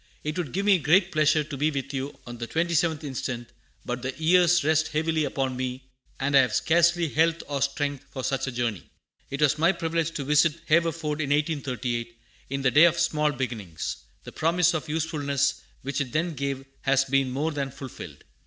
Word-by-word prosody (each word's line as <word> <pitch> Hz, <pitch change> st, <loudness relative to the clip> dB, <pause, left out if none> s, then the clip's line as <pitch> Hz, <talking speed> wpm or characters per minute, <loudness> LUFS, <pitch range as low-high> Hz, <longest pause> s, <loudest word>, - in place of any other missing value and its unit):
It 150 Hz, 0 st, -3 dB
would 155 Hz, -8 st, -3 dB
give 195 Hz, +2 st, -2 dB
me 200 Hz, -3 st, +5 dB
great 175 Hz, +5 st, +3 dB
pleasure 155 Hz, -1 st, +3 dB
to 150 Hz, 0 st, -7 dB
be 150 Hz, +3 st, +2 dB
with 140 Hz, -1 st, -4 dB
you 135 Hz, +1 st, -4 dB
on 120 Hz, -1 st, -8 dB
the 120 Hz, -, -4 dB
27th 165 Hz, -1 st, 0 dB
inst., 135 Hz, -2 st, -4 dB, 0.6 s
but 125 Hz, 0 st, -3 dB
the 130 Hz, +1 st, -4 dB
years 175 Hz, +1 st, +4 dB
rest 155 Hz, +1 st, +2 dB
heavily 155 Hz, 0 st, 0 dB
upon 135 Hz, -2 st, -2 dB
me, 130 Hz, 0 st, -4 dB, 0.4 s
and 140 Hz, +1 st, 0 dB
I -, -, +9 dB
have 130 Hz, -2 st, +2 dB
scarcely 170 Hz, +1 st, +3 dB
health 165 Hz, +2 st, +1 dB
or 140 Hz, -1 st, -3 dB
strength 145 Hz, 0 st, -1 dB
for 130 Hz, -, -6 dB
such 135 Hz, +1 st, -1 dB
a -, -, -2 dB
journey. 120 Hz, -6 st, -3 dB, 0.4 s
It 140 Hz, +2 st, -1 dB
was 150 Hz, +1 st, +3 dB
my 165 Hz, +3 st, +5 dB
privilege 165 Hz, -2 st, -1 dB
to 140 Hz, -, -2 dB
visit 150 Hz, +3 st, +3 dB
Haverford 160 Hz, -2 st, +1 dB
in 145 Hz, -, -2 dB
1838, 130 Hz, -6 st, -1 dB, 0.3 s
in 135 Hz, 0 st, -3 dB
"the 130 Hz, -, +3 dB
day 150 Hz, +7 st, +7 dB
of 170 Hz, 0 st, +3 dB
small 150 Hz, -3 st, +2 dB
beginnings." 115 Hz, -, -4 dB, 0.3 s
The -, -, -9 dB
promise 170 Hz, +2 st, +2 dB
of 160 Hz, -1 st, -3 dB
usefulness 145 Hz, -3 st, 0 dB, 0.2 s
which 140 Hz, +1 st, -2 dB
it 125 Hz, -4 st, -4 dB
then 170 Hz, +2 st, 0 dB
gave 135 Hz, -1 st, -3 dB, 0.2 s
has 135 Hz, 0 st, +2 dB
been 135 Hz, 0 st, +1 dB
more 145 Hz, +5 st, -1 dB
than 140 Hz, -2 st, -3 dB
fulfilled. 135 Hz, -1 st, -10 dB
145 Hz, 195 wpm, -26 LUFS, 135-160 Hz, 0.6 s, I